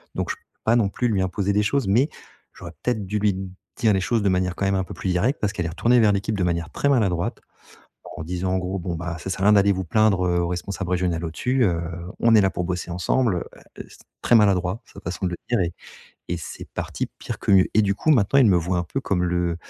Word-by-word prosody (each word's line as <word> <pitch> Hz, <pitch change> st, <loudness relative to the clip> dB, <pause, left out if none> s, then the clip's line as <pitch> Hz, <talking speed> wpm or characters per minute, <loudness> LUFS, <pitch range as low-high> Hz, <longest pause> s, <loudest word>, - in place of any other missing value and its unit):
Donc -, -, -2 dB
je -, -, -4 dB
peux -, -, -30 dB, 0.2 s
pas 115 Hz, -, +3 dB
non 110 Hz, -4 st, +3 dB
plus 120 Hz, +4 st, -1 dB
lui 100 Hz, -4 st, +1 dB
imposer 95 Hz, +2 st, -1 dB
des 105 Hz, +1 st, +2 dB
choses, 135 Hz, +2 st, 0 dB
mais 120 Hz, +10 st, +3 dB, 0.4 s
j'aurais 85 Hz, -, -10 dB
peut-être 110 Hz, -5 st, -1 dB
dû 105 Hz, +3 st, -2 dB
lui 100 Hz, -2 st, +2 dB, 0.4 s
dire 110 Hz, -3 st, +3 dB
les 95 Hz, -, +2 dB
choses 115 Hz, +3 st, 0 dB
de 100 Hz, -, +3 dB
manière 90 Hz, -1 st, 0 dB
quand 100 Hz, -, -2 dB
même 100 Hz, 0 st, +1 dB
un 95 Hz, -, 0 dB
peu -, -, -9 dB
plus 95 Hz, +2 st, -4 dB
directe. 100 Hz, +11 st, +1 dB
Parce 105 Hz, -, +1 dB
qu'elle 90 Hz, -, -3 dB
est -, -, -2 dB
retournée 120 Hz, +9 st, +3 dB
vers 105 Hz, -3 st, +4 dB
l'équipe 100 Hz, +2 st, -1 dB
de 95 Hz, -, 0 dB
manière 85 Hz, -1 st, -1 dB
très -, -, -1 dB
maladroite 95 Hz, -10 st, +1 dB, 0.8 s
en -, -, -5 dB
disant 90 Hz, +3 st, -2 dB
en -, -, +2 dB
gros: 95 Hz, +1 st, -3 dB
«Bon, 85 Hz, -1 st, -4 dB
ben, 85 Hz, +1 st, -4 dB
ça 95 Hz, -, -6 dB
sert 95 Hz, -, -3 dB
à -, -, 0 dB
rien 105 Hz, -, +6 dB
d'aller 100 Hz, -1 st, +5 dB
vous 95 Hz, -1 st, -1 dB
plaindre 100 Hz, +1 st, +2 dB
heu, 85 Hz, 0 st, +1 dB
au 85 Hz, -, -1 dB
responsable 90 Hz, +1 st, -4 dB
régional 90 Hz, -2 st, 0 dB
au-dessus, 125 Hz, +11 st, 0 dB
heu, 85 Hz, -4 st, +1 dB, 0.4 s
on 115 Hz, -1 st, +4 dB
est 105 Hz, -, +7 dB
là 95 Hz, -, +3 dB
pour 90 Hz, -, -3 dB
bosser 90 Hz, 0 st, -3 dB
ensemble» 100 Hz, +5 st, +1 dB, 0.2 s
heu, -, -, -17 dB, 0.2 s
et -, -, -6 dB
c'est -, -, -17 dB, 0.2 s
très -, -, +2 dB
maladroit 100 Hz, -1 st, +3 dB
sa -, -, -13 dB
façon 90 Hz, +2 st, -4 dB
de -, -, -4 dB
le -, -, -2 dB
dire 120 Hz, -, +2 dB
et 85 Hz, -2 st, -1 dB, 0.6 s
et 85 Hz, -, -1 dB
c'est 80 Hz, -, -8 dB
parti -, -, -3 dB
pire -, -, -6 dB
que -, -, -1 dB
mieux 95 Hz, -2 st, +7 dB
et 110 Hz, -, +5 dB
du 100 Hz, -1 st, +1 dB
coup, 155 Hz, -, +1 dB
maintenant, 125 Hz, +1 st, +3 dB
ils 130 Hz, -, +6 dB
me 95 Hz, -4 st, +5 dB
voient 90 Hz, +1 st, 0 dB
un 85 Hz, -, -1 dB
peu 80 Hz, -, -3 dB
comme 90 Hz, -2 st, 0 dB
le 90 Hz, -1 st, 0 dB
95 Hz, 270 wpm, -23 LUFS, 90-105 Hz, 0.8 s, est